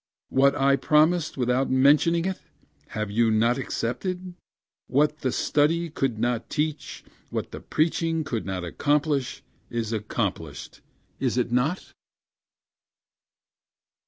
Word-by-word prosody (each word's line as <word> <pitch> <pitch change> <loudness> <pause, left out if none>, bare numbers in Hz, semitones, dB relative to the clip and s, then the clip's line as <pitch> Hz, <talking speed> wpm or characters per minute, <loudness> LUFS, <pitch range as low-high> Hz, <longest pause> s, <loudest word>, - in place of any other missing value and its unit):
What 140 +1 +4
I 140 0 +3
promised 155 +2 +2
without 125 +1 +1
mentioning 150 +6 +4
it 190 0 -3 0.5
have 105 -1 -4
you 115 +2 +3
not 115 +4 +2
accepted? 180 +10 -3 0.5
What 150 +3 +2
the 130 - -1
study 165 +5 +1
could 135 -6 -1
not 120 +1 -1
teach 150 -1 -3 0.3
what - - -4
the - - -7
preaching 165 0 0
could 120 -6 -3
not 95 -2 -3
accomplish, 145 - 0 0.3
is 115 -1 -3
accomplished, 105 -1 -4 0.4
is 125 -2 0
it 120 -1 0
not? 135 +9 0
135 Hz, 115 wpm, -25 LUFS, 120-155 Hz, 0.5 s, What